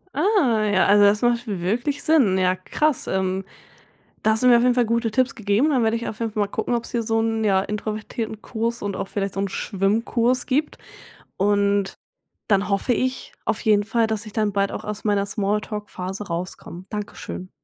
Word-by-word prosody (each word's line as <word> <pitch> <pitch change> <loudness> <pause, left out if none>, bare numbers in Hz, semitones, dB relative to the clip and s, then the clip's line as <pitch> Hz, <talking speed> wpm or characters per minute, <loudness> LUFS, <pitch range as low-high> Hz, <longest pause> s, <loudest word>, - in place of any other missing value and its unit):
Ah, 290 - +2
ja, 190 -2 +3
also 205 +1 +5
das 205 +2 +4
macht 240 0 +1
w 200 -4 -3
wirklich 240 +10 -1
Sinn, 260 -13 +4
ja 185 0 +2
krass, 280 +10 -1
ähm, 190 0 -1 0.8
da 220 - +4
hast 220 - +2
du 250 - +5
mir 240 - +8
auf 235 - +3
jeden 250 -1 +4
Fall 245 - +3
gute 230 -1 0
Tipps 255 +2 +1
gegeben. 220 +7 +2
Dann 255 -5 +2
werde 220 0 +2
ich 235 - -4
auf 220 - -6
jeden 230 -2 -2
Fall 215 - -2
mal 200 - -1
gucken, 220 +3 -2
ob's 235 - -2
hier 235 -1 -1
so 225 0 +1
'nen, 225 -1 -1
ja, 195 -2 +3
introvertierten 215 +1 -4
Kurs 230 +1 -3
und 200 -1 -3
auch 195 - -3
vielleicht 195 -1 -3
so 195 - -2
'n 200 - -1
Schwimmkurs 230 +6 0
gibt. 290 +3 0 0.6
Und 200 0 +1 0.5
dann 200 -1 +2
hoffe 200 +5 +1
ich 255 +1 -2
auf 220 - -1
jeden 210 -2 +4
Fall, 225 +2 +1
dass 220 0 -2
ich 215 - -9
dann 215 -2 0
bald 200 0 +1
auch - - -6
aus 210 0 -4
meiner 205 -2 +1
Smalltalk-Phase 205 -1 -3
rauskomme. 175 +1 -5
Danke 210 -1 -5
schön. 185 0 -7
215 Hz, 210 wpm, -23 LUFS, 200-235 Hz, 0.8 s, mir